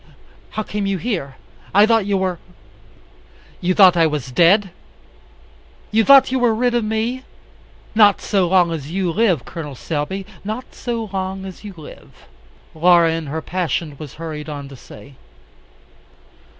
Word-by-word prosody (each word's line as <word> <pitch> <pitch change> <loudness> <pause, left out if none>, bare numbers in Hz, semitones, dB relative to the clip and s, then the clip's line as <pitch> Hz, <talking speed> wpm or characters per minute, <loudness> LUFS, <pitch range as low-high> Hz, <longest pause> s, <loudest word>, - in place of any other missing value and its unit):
How 215 - 0
came 205 -1 -3
you 195 -1 -1
here? 170 - -4 0.4
I 205 +1 +7
thought 225 -3 +2
you 200 -1 +1
were 185 -3 -2 0.6
" 60 0 -29
"You 180 +1 0
thought 185 -3 +7
I 165 -1 +4
was 150 -4 -4
dead? 185 - +4 1.2
You 220 +1 +3
thought 275 +1 +6
you 260 - +1
were 240 -3 +2
rid 245 +2 +1
of 240 -1 +1
me? 220 +4 -2 0.7
Not 210 -2 +5
so 195 -4 0
long 175 -1 +3
as 150 -3 -5
you 180 0 -1
live, 180 - +1
Col. 150 -5 -7
Selby, 165 +8 -4 0.2
not 220 +5 -6
so 230 -2 -4
long 190 0 -4
as 190 +1 -10
you 205 -3 -9
live," 155 - -14 0.5
Laura 170 0 +4
in 165 -2 -4
her 155 +3 -4
passion 170 -4 -3
was 150 -4 -9
hurried 155 -1 -7
on 145 -2 -6
to 140 - -11
say. 140 +2 -14
185 Hz, 160 wpm, -19 LUFS, 160-215 Hz, 1.2 s, I